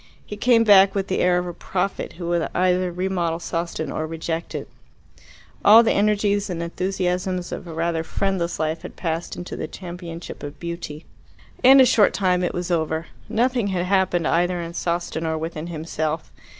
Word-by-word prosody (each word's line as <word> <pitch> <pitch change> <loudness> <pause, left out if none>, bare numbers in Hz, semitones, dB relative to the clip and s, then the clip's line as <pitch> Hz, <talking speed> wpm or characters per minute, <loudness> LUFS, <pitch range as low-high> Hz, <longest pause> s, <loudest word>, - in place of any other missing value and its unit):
He 210 - -7
came 230 +2 +4
back 195 -2 +6
with 195 -1 -1
the 190 - 0
air 180 0 +3
of 180 - -1
a 175 - -5
prophet 190 +3 -3
who 170 0 -6
would 170 -1 0
either 180 0 +2
remodel 175 -2 -1
Sawston 165 -2 -3
or 155 - -3
reject 165 +1 -4
it. - - -4 1.0
All 220 +3 +9
the 225 - +2
energies 205 0 +1
and 170 -2 -3
enthusiasms 180 0 -2
of 180 - -6
a 165 - -7
rather 165 0 0
friendless 180 0 -1
life 155 +1 -1
had - - -9
passed 165 -1 -3
into 175 - -6
the - - -4
championship 175 -2 -8
of 145 0 -8
beauty. 170 -3 -6 0.6
In 265 +2 +8
a 260 - +8
short 230 -4 +4
time 180 -2 +1
it 175 - 0
was 175 0 -3
over. 160 -1 -1 0.2
Nothing 240 -1 +1
had 180 -2 -1
happened 185 -3 +2
either 175 +1 +1
in 170 0 -5
Sawston 170 -1 -2
or 160 -1 -1
within 160 0 -5
himself. 160 -1 -3
175 Hz, 180 wpm, -23 LUFS, 165-190 Hz, 1.0 s, All